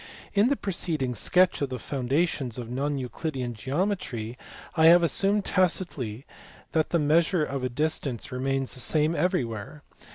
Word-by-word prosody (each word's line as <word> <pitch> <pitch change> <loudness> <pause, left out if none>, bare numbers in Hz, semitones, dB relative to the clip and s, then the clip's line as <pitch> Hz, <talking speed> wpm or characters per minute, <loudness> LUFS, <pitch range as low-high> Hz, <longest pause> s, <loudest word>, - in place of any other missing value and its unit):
In 205 +4 +4
the 285 - +2
preceding 165 - -2
sketch 180 - +3
of 140 - 0
the 130 - -4
foundations 135 0 -1
of 120 -1 -6
non 140 +3 -1
Euclidean 130 -1 -4
geometry 130 - -2 0.4
I 160 -1 +6
have 170 +1 +7
assumed 195 +6 +1
tacitly 155 - 0 0.5
that 160 -1 +1
the 170 - +2
measure 165 +3 +3
of 140 -3 -3
a 130 - 0
distance 140 -3 -2
remains 135 +1 -1
the 130 - -3
same 155 +5 +2
everywhere. 145 - -2
145 Hz, 150 wpm, -27 LUFS, 125-170 Hz, 0.5 s, have